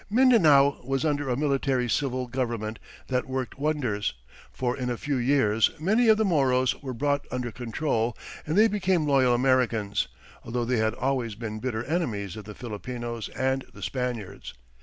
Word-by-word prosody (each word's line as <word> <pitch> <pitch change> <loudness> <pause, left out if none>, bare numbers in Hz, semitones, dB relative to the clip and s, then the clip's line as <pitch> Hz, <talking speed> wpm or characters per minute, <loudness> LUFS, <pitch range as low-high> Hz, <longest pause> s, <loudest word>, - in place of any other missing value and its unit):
Mindanao 175 - +5
was 135 +3 -1
under 145 -2 0
a 125 - 0
military 135 -3 +1
civil 130 0 0
government 115 -3 -3 0.3
that 125 0 -2
worked 130 0 -4
wonders, 135 - -1 0.4
for 125 -1 -1
in 125 -2 -3
a 120 - -2
few 145 +2 -2
years 120 -4 +3
many 215 +9 +3
of 220 -1 +6
the 220 - +2
Moros 130 -7 +2
were 130 -3 -5
brought 145 +3 0
under 125 -1 -3
control, 120 -1 -1 0.3
and 155 +5 0
they 220 +2 +7
became 190 -6 +1
loyal 130 -4 +4
Americans, 120 -5 +1 0.4
although 120 +1 -2
they 125 +1 +1
had 110 +1 +1
always 125 -4 -1
been 110 -1 -5
bitter 115 -2 -2
enemies 115 - -2
of 110 -2 -8
the 105 0 -9
Filipinos 120 0 -5
and 130 0 0
the - - -9
Spaniards. 120 -7 -4
130 Hz, 165 wpm, -26 LUFS, 115-145 Hz, 0.4 s, they